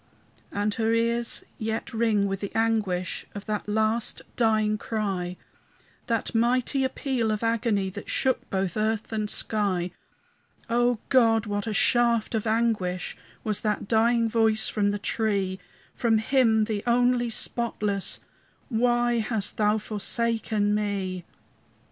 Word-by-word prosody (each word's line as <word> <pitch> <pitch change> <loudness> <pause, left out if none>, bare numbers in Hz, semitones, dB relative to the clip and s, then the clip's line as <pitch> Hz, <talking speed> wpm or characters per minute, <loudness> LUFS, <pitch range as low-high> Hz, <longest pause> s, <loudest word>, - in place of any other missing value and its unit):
And 205 +1 0
her 225 0 0
ears 235 +1 +1 0.2
yet 220 +1 -3
ring 220 -3 +2
with 195 -1 -2
the 200 - -5
anguish 210 -6 0
Of 205 - -6
that 210 0 -3
last 220 +2 0
dying 215 -2 +2
cry, 190 -6 -2 0.7
That 230 -2 -1
mighty 250 +4 +2
appeal 260 -3 -1
of 215 +1 -1
agony 225 -4 +1
That 200 +2 -8
shook 260 -2 0
both 190 -2 -1
earth 215 0 -1
and 215 -1 -1
sky. 190 -6 0 0.8
O 240 0 +3
God, 230 -4 +4
what 205 0 -2
a - - -1
shaft 235 0 +2
of 220 0 -1
anguish 215 -5 0 0.3
Was 215 -2 -1
that 210 -2 -1
dying 230 +1 +3
voice 220 -1 +2
from 205 -1 +1
the 205 - -1
tree! 200 -3 -1 0.3
From 230 -2 +2
Him 225 -1 +3
the 210 -1 -2
only 245 0 +3
spotless, 210 -4 -1 0.5
"Why 240 0 +2
hast 215 -2 -1
Thou 210 0 +3
forsaken 215 0 0
me?" 195 -4 -2
220 Hz, 130 wpm, -26 LUFS, 205-230 Hz, 0.8 s, God